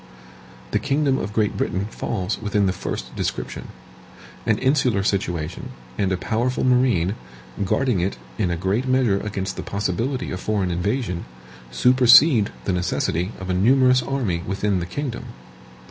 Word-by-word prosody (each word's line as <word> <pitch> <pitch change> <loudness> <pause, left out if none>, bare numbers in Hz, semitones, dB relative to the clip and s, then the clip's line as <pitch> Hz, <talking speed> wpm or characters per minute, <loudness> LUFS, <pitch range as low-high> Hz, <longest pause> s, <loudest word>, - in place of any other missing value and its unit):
The - - +2
kingdom 140 -1 +1
of 100 - -4
Great 105 -1 0
Britain 95 +2 -1
falls 100 -2 -3
within 105 -1 +1
the 95 - +1
first - - -5
description. - - -4 0.8
An 110 - +3
insular 130 -6 +2
situation, 85 -5 -2 0.3
and 95 +4 0
a 95 - +1
powerful 115 +7 -1
marine, 125 -8 +3 0.5
guarding 120 +2 +1
it 90 -6 -1 0.2
in 95 -5 +1
a 85 - -1
great 100 +8 -1
measure 130 -6 +2
against 95 -2 -4
the - - -3
possibility 105 +7 -2
of 90 - -4
foreign 100 -3 -1
invasion, 90 +1 -2 0.4
supersede 125 - +6 0.2
the 95 - 0
necessity 90 +1 -1
of 95 0 -4
a - - +1
numerous 125 +6 +4
army 120 -10 -1
within 100 0 0
the 85 - -4
kingdom. 130 +2 -4
105 Hz, 145 wpm, -22 LUFS, 95-125 Hz, 0.8 s, supersede